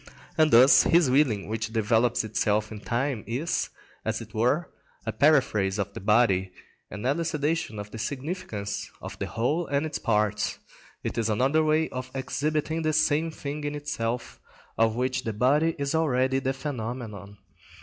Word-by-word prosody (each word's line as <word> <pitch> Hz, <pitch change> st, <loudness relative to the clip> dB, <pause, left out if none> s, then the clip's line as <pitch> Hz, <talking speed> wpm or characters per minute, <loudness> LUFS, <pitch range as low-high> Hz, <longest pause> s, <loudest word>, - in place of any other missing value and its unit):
And 155 Hz, -1 st, +4 dB
thus 130 Hz, +2 st, +8 dB
his 165 Hz, -6 st, +4 dB
willing 125 Hz, -8 st, +2 dB
which 110 Hz, +1 st, -3 dB
develops 115 Hz, +2 st, +2 dB
itself 110 Hz, 0 st, 0 dB
in 110 Hz, -, -7 dB
time 120 Hz, +1 st, -2 dB
is, 135 Hz, +10 st, -1 dB, 0.3 s
as -, -, -1 dB
it -, -, -11 dB
were, 125 Hz, +10 st, +1 dB, 0.4 s
a -, -, -1 dB
paraphrase 110 Hz, -10 st, +3 dB
of 100 Hz, -1 st, -1 dB
his -, -, -6 dB
body, 95 Hz, -3 st, +3 dB, 0.4 s
an 105 Hz, +2 st, -7 dB
elucidation 150 Hz, -3 st, -1 dB
of 105 Hz, 0 st, -7 dB
the 115 Hz, -, -7 dB
significance 130 Hz, -, -4 dB
of -, -, -9 dB
the -, -, -2 dB
whole 150 Hz, +10 st, -1 dB
and 140 Hz, +2 st, 0 dB
its 155 Hz, -2 st, -4 dB
parts; 105 Hz, -1 st, 0 dB, 0.5 s
it 115 Hz, -, -2 dB
is 115 Hz, -1 st, 0 dB
another 135 Hz, +9 st, +2 dB
way 155 Hz, +1 st, +2 dB
of 130 Hz, 0 st, -6 dB
exhibiting 155 Hz, +4 st, -1 dB
the 155 Hz, -1 st, 0 dB
same 155 Hz, +1 st, +2 dB
thing 150 Hz, -1 st, -6 dB
in 145 Hz, 0 st, -3 dB
itself, 125 Hz, -5 st, -3 dB, 0.4 s
of 115 Hz, -1 st, +2 dB
which 130 Hz, +1 st, -1 dB
the 110 Hz, -, -3 dB
body 145 Hz, +9 st, +2 dB
is 140 Hz, 0 st, -2 dB
already 130 Hz, -4 st, +2 dB
the 135 Hz, 0 st, -1 dB
phenomenon. 115 Hz, -7 st, -6 dB
130 Hz, 160 wpm, -27 LUFS, 110-150 Hz, 0.5 s, thus